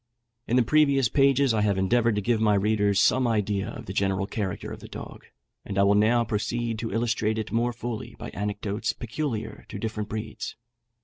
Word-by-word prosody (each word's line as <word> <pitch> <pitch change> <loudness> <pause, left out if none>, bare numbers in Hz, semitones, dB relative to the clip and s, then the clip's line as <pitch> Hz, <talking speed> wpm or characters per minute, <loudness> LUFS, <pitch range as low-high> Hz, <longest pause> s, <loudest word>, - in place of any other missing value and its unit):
In 120 - +1
the 125 - +5
previous 140 -2 +3
pages 135 -2 +3
I 110 - +1
have 100 -2 +2
endeavoured 115 +4 +2
to 105 - 0
give 115 0 +1
my 105 -2 +4
readers 105 0 +2
some 130 -1 +4
idea 105 -3 0
of - - -8
the 95 - -6
general 95 0 +1
character 100 -2 -4
of - - -7
the - - -10
dog, - - -9 0.4
and 100 - -5
I 100 - +5
will 100 +1 +5
now 110 +3 +4
proceed 115 +1 -2
to 115 - -3
illustrate 110 0 0
it 110 -1 -4
more 120 +1 +1
fully 120 -1 -6
by - - -7
anecdotes 105 +1 -2
peculiar 120 -1 -4
to - - -6
different 105 0 -4
breeds. 110 +1 -5
110 Hz, 195 wpm, -26 LUFS, 105-120 Hz, 0.4 s, the